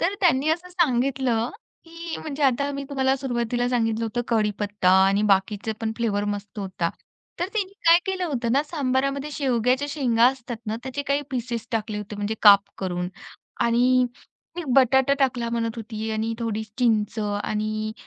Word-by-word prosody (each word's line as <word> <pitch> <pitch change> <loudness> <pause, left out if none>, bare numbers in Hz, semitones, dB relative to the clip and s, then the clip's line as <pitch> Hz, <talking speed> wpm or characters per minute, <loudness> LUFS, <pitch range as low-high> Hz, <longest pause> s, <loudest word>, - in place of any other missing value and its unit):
तर 375 +4 +1
त्यांनी 310 -5 +3
असं 345 +3 -2
सांगितलं, 260 -8 +1 0.3
की 335 0 -7
म्हणजे 295 -1 -5
आता 280 +1 +2
मी 280 0 -4
तुम्हाला 265 -2 +1
सुरुवातीला 245 -2 -1
सांगितलं 225 -2 0
होतं 230 +2 -2
कडीपत्ता 210 -3 +1 0.2
आणि 195 +1 +2
बाकीचे 200 +3 +1
पण 220 -1 -1
फ्लेवर 210 -4 0
मस्त 205 +1 -5
होता. 185 -4 -2 0.5
तर 350 - +1
तिने 395 -3 -1 0.2
काय 335 +1 +8
केलं 380 -1 -1
होतं 240 -8 -1
ना, 275 +3 +3
सांबारामध्ये 275 -1 -1
शेवग्याच्या 255 -1 +1
शेंगा 245 -5 +3
असतात 255 -2 -2
ना, 215 +1 -2
त्याचे 265 +2 -4
काही 285 +1 0
पीसेस 240 -3 -3
टाकले 215 -1 -2
होते 210 0 -7
म्हणजे 205 +1 -2
काप 200 -2 +9 0.2
करून 180 -1 -2 0.5
आणि 250 +2 +3 0.5
ती 350 - -3
बटाटा 265 +1 +5
टाकला 250 -4 +1
म्हणत 230 -1 -2
होती 220 0 -5
आणि 220 +1 -1
थोडी 220 -2 -2 0.2
चिंच 220 -4 +1
आणि 215 +1 -2
240 Hz, 160 wpm, -24 LUFS, 215-275 Hz, 0.5 s, काप